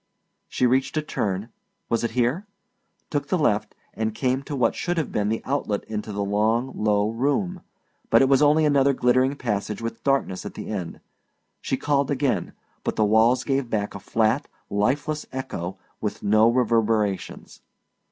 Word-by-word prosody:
She 125 - +1
reached 130 +4 +1
a 155 - +1
turn 100 -6 -2 0.4
was 115 - 0
it 115 - +1
here? 130 - +1 0.6
took 145 -2 -1
the 185 - +1
left 115 -10 +1 0.2
and 110 -1 -2
came 130 +1 0
to 145 +1 -6
what 125 -4 +2
should 175 -1 -2
have 160 - -1
been 105 0 0
the 115 - -2
outlet 130 -7 -1
into 105 0 -5
the 100 0 -2
long, 110 +5 +1
low 105 0 +1
room, 145 - -1 0.5
but 115 - +6
it - - +4
was 135 0 +4
only 150 +1 +5
another 140 -2 +4
glittering 130 +2 +2
passage 105 -5 -2
with 115 0 -5
darkness 135 -9 0
at - - -8
the - - -7
end. 95 -6 -5 0.6
She 135 - -1
called 140 0 +1
again, 140 -2 0 0.3
but - - -2
the 110 - +3
walls 115 +4 +4
gave 135 -3 -1
back 105 -2 -1
a 100 - -7
flat, 110 +7 +1 0.2
lifeless 145 +9 0
echo 95 -9 -5 0.2
with 105 - -3
no 110 +2 +5
reverberations. 115 -4 0
120 Hz, 170 wpm, -24 LUFS, 105-140 Hz, 0.6 s, but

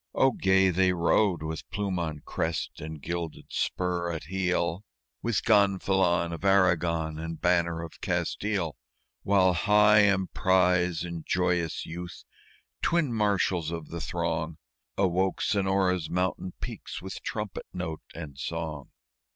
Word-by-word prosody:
Oh, 135 - +4
gay 95 -3 +3
they 90 +1 +3
rode 85 0 +2
with 80 0 -5
plume 100 -3 -2
on 80 -3 -3
crest 80 0 -3
and 80 0 -6
gilded 85 -2 -4
spur 90 -1 -1
at 80 -2 -5
heel, 90 +1 -1 0.4
With 115 -3 0
gonfalon 95 -5 +3
of 85 - -7
Aragon 85 -5 +2
and 80 0 -5
banner 85 -2 +1
of 80 - -10
Castile! 100 -7 -1 0.4
While 95 -2 +4
High 105 +3 +5
Emprise 90 -3 +2
and 85 -2 -5
Joyous 90 -2 0
Youth, 85 +1 -7 0.6
twin 165 -7 +1
marshals 100 -6 +1
of 85 -2 -6
the 85 0 -5
throng, 85 -2 -2 0.4
Awoke 95 0 +1
Sonora's 95 -4 +1
mountain 90 0 -1
peaks - - -6
with 95 +1 -7
trumpet 105 -3 -5
note 80 -4 -4
and 75 -5 -8
song. 80 -4 -4
90 Hz, 125 wpm, -28 LUFS, 85-95 Hz, 0.6 s, High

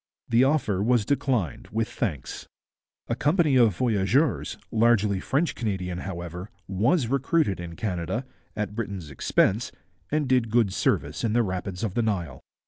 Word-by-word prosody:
The 115 +2 +5
offer 130 -9 +1
was 115 0 +2
declined 125 - -1
with 110 +2 0
thanks. 80 - -4 0.6
A - - 0
company 150 -2 +2
of 115 -8 +4
voyageurs, 120 +6 +1
largely 110 -4 +3
French 145 - 0
Canadian, 95 -5 -3
however, 90 0 -6 0.2
was 115 - +2
recruited 135 - +1
in 85 -1 -7
Canada, 95 +5 -3 0.3
at 105 -1 -3
Britain's 100 -8 -5
expense, 100 - +1 0.4
and 150 -1 0
did 125 -3 +2
good 110 -4 +2
service - - 0
in 110 -2 +1
the 120 0 +3
rapids 95 -1 -4
of 105 -5 -1
the 120 - +1
Nile. 90 - -2
110 Hz, 145 wpm, -26 LUFS, 95-125 Hz, 0.6 s, The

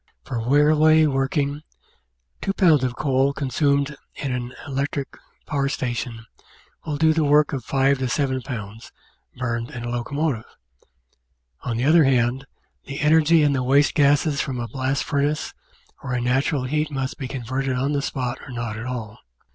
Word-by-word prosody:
For 120 - -3
railway 150 +5 +4
working, 140 +1 0 0.8
2 195 - -1
Ib. 160 -8 +5
of 125 -1 -1
coal 135 0 +1
consumed 140 +1 0 0.2
in 135 -3 -3
an 125 0 -4
electric 140 0 -2 0.4
power 140 -2 -1
station 120 -4 -4 0.6
will 150 -2 -2
do 160 +1 +4
the 160 0 +1
work 150 0 +4
of 130 -4 -3
5 135 -1 +1
7 135 -2 0
Ib. 115 -5 -6 0.6
burned 120 -2 -2
in 120 - -7
a 120 - -3
locomotive. 125 0 -2 1.2
On 115 -2 -3
the 125 - 0
other 160 +2 +6
hand, 130 0 +1 0.4
the 140 +1 -6
energy 160 +1 +4
in 145 -1 +3
the 130 - 0
waste 140 +3 +3
gases 145 0 +3
from 130 -2 -3
a 120 - -3
blast 135 +2 -1
furnace 145 +1 -1 0.5
or 130 -2 -3
in 120 - -1
natural 135 +3 +1
heat 150 +4 -1
must 135 -2 -4
be 135 - -4
converted 130 +1 -3
on 135 +3 0
the 145 -1 0
spot 125 -3 -3
or - - -12
not 120 -3 -4
at 115 +3 -6
all. 115 -4 -6
135 Hz, 165 wpm, -23 LUFS, 125-145 Hz, 1.2 s, other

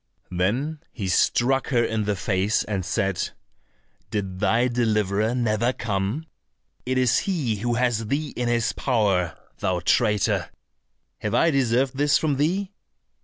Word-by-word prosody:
Then 120 - -1
he 100 -6 -4
struck 125 +8 +2
her 120 -3 +2
in 110 -2 -1
the 105 0 0
face, 95 +2 0
and 100 -3 -3
said, 95 0 -1 0.8
"Did 95 -3 -3
thy 120 +5 +3
deliverer 110 -2 +1
never 120 0 +1
come? 105 +7 -2 0.6
It 130 0 0
is 125 -2 +3
he 145 - -1
who 120 +3 -1
has 115 -2 0
thee 145 +5 -1
in 120 -1 -1
his 120 -1 +1
power, 100 - +1 0.2
thou 90 -1 0
traitor. 105 -2 +2 0.7
Have - - -2
I 165 - +4
deserved 130 0 +1
this 145 0 +4
from 150 -4 0
thee?" 185 +7 0
115 Hz, 140 wpm, -24 LUFS, 100-130 Hz, 0.8 s, I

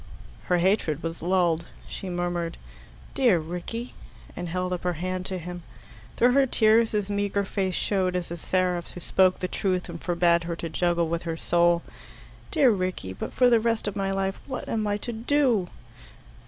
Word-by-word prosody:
Her 180 - +2
hatred 175 -4 +1
was 165 0 -4
lulled. 170 -2 +2 0.2
She 190 - -6
murmured, 175 -1 -2 0.6
"Dear 245 -9 +4
Rickie!" 180 +9 -5 0.4
and 175 -1 -5
held 180 +1 -1
up 180 - -3
her 180 0 0
hand 185 +2 -3
to 190 - -3
him. 175 0 -7 0.6
Through 245 +1 +5
her 270 +1 +4
tears 225 -1 +4
his 210 -2 0
meagre 200 0 0
face 190 -2 -1
showed 185 -3 0
as 175 -2 -3
a 170 - -4
seraph's 180 0 -1
who - - -7
spoke 185 +1 +3
the 185 - -2
truth 185 -1 -1
and 170 -1 -7
forbade 170 -1 +2
her 170 0 -3
to 165 0 -5
juggle 170 +1 +1
with 170 +1 -2
her 165 -1 -4
soul. 170 0 +3 0.7
"Dear 280 -6 +4
Rickie 185 - -2
but - - -5
for 250 - +4
the 235 -2 +5
rest 230 -1 0
of 205 - -3
my 195 -1 -1
life 195 0 -1
what 265 - -5
am 215 -2 -1
I 205 0 0
to 235 +3 -5
do?" 235 -5 +1
185 Hz, 185 wpm, -26 LUFS, 175-205 Hz, 0.7 s, Through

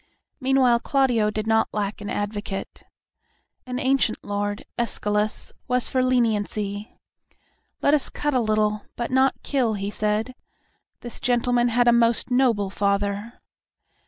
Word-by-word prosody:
Meanwhile 260 -3 +3
Claudio 245 -5 +2
did 215 0 -3
not 220 0 +2
lack 205 0 -3
an 205 - -5
advocate. 205 -1 -4 0.8
An 250 0 -3
ancient 260 -3 +1
lord, 205 0 -3
Escalus, 210 -2 -1
was 250 0 +1
for 260 - +1
leniency. 215 -4 -1 0.9
"Let 285 - +4
us 300 - +2
cut 295 0 -2
a 255 - +3
little, 215 -2 +1
but 240 0 -3
not 265 +1 +2
kill," 245 -6 0
he 200 0 -3
said. 215 +4 -1 0.7
"This 240 - -7
gentleman 245 -1 +2
had 240 +1 +2
a 240 - +7
most 235 +1 +2
noble 235 -6 +2
father." 200 +2 -1
225 Hz, 130 wpm, -24 LUFS, 210-250 Hz, 0.9 s, a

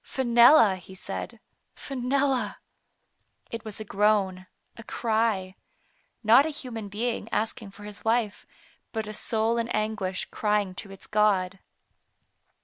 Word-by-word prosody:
"Fenella," 235 -4 +5
he 185 +1 -13
said, 195 +4 -6 0.4
"Fenella;" 265 -3 -1 0.9
it 230 -1 -5
was 215 -1 -7
a 215 - -6
moan, 195 -3 +2 0.3
a - - -10
cry; 220 -4 0 0.7
not 230 +5 +7
a 315 - -2
human 240 -8 -6
being 230 +4 -3
asking 220 -1 -2
for 205 +1 -14
his 210 0 -9
wife, 225 -2 0 0.5
but 220 -2 -2
a 215 - -6
soul 225 +2 0
in 230 0 -2
anguish 210 -4 -1
crying 210 -3 0
to 195 +2 -8
its 195 -1 -12
God. 195 -3 +2
215 Hz, 130 wpm, -27 LUFS, 200-235 Hz, 0.9 s, not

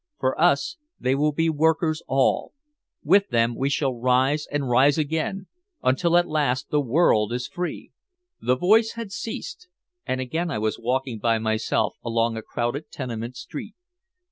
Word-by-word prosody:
For 130 +4 0
us 275 - +2 0.2
they 130 - +1
will 150 +2 +2
be 165 +3 0
workers 160 +1 +1
all. 135 0 +1 0.5
With 200 +6 +4
them 115 -1 +2
we 135 +3 0
shall 140 -2 0
rise 130 +5 +1
and 145 -2 -1
rise 135 +4 +4
again 160 +5 -2 0.4
until 170 +7 +3
at 175 0 +3
last 140 -5 -1
the 150 - +3
world 120 -6 +2
is 125 +1 -2
free!" 175 0 -5 0.5
The 125 - +2
voice 220 - +4
had 230 -3 -7
ceased 360 - -6 0.4
and 130 - -2
again 160 +7 -2
I 150 - -2
was 110 0 -1
walking 125 -1 -2
by 115 +1 +2
myself 110 0 0
along 115 0 0
a 110 - -4
crowded 120 +7 -3
tenement 120 -2 -5
street. 210 +5 -8
140 Hz, 160 wpm, -24 LUFS, 120-165 Hz, 0.5 s, With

